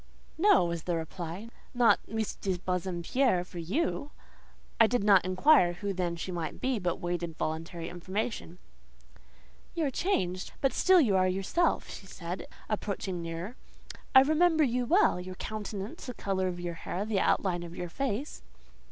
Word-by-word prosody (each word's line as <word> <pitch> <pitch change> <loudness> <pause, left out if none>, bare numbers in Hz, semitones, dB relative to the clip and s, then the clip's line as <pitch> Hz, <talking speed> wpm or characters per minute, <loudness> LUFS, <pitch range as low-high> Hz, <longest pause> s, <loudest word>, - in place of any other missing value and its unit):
"No," 400 - +5
was 170 -2 -3
the 175 - 0
reply, 170 +5 -6 0.3
"not 240 -1 +5
Miss 220 -1 -2
de 190 -2 -2
Bassompierre 180 +4 0
for 180 -1 -9
you!" 285 - -1 0.7
I 225 - +8
did 245 -2 0
not 200 -3 +6
inquire 185 - +4
who 200 +3 -3
then 175 -2 -1
she 170 +2 -5
might 170 -2 -4
be, 255 -3 0
but 175 -2 -1
waited 175 -2 -3
voluntary 165 +1 -3
information. 185 +1 -4 1.2
"You 330 - +1
are 275 - 0
changed, 185 - -1
but 270 - +1
still 370 -1 +5
you 225 - +3
are 185 0 +4
yourself," 195 - +1
she 195 - -9
said, 175 -1 -6 0.2
approaching 200 -4 -3
nearer. 170 +8 -5 0.6
"I 265 - +11
remember 315 +3 +4
you 250 -2 0
well—your 185 - +2
countenance, 210 +1 -6
the 250 - -5
colour 190 -1 -1
of 175 -1 -4
your 175 -1 -3
hair, 180 +4 -4
the 215 -3 0
outline 180 -2 +1
of 170 0 -8
your 175 -1 -5
face…." 270 - -3
190 Hz, 160 wpm, -30 LUFS, 175-245 Hz, 1.2 s, I